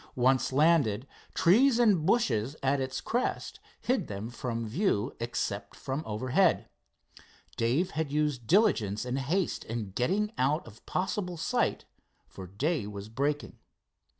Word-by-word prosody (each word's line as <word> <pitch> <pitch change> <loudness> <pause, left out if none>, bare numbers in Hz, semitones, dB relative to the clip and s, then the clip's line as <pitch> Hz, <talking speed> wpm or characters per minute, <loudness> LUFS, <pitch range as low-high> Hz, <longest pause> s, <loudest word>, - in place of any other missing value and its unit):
Once 130 +1 +2
landed, 140 -6 +3 0.3
trees 230 +8 +5
and 205 -9 +3
bushes 135 - +1
at 135 +1 +2
its 130 0 -3
crest 245 +2 -2 0.2
hid 255 0 0
them 105 +3 -5
from 115 -2 -3
view 125 - 0
except 120 +1 -3
from 135 +3 -4
overhead. 130 - +2 0.9
Dave 135 +12 +1
had 155 -3 -2
used 145 -6 0
diligence 125 - +3
and 125 +2 -2
haste 170 +7 -1
in 110 -3 -5
getting 195 - 0
out 145 +5 +1
of 115 0 -14
possible 180 -1 -2
sight, - - 0 0.4
for 95 -1 -10
day 130 - -1
was 105 0 -7
breaking. 145 +5 -2
135 Hz, 130 wpm, -29 LUFS, 115-175 Hz, 0.9 s, trees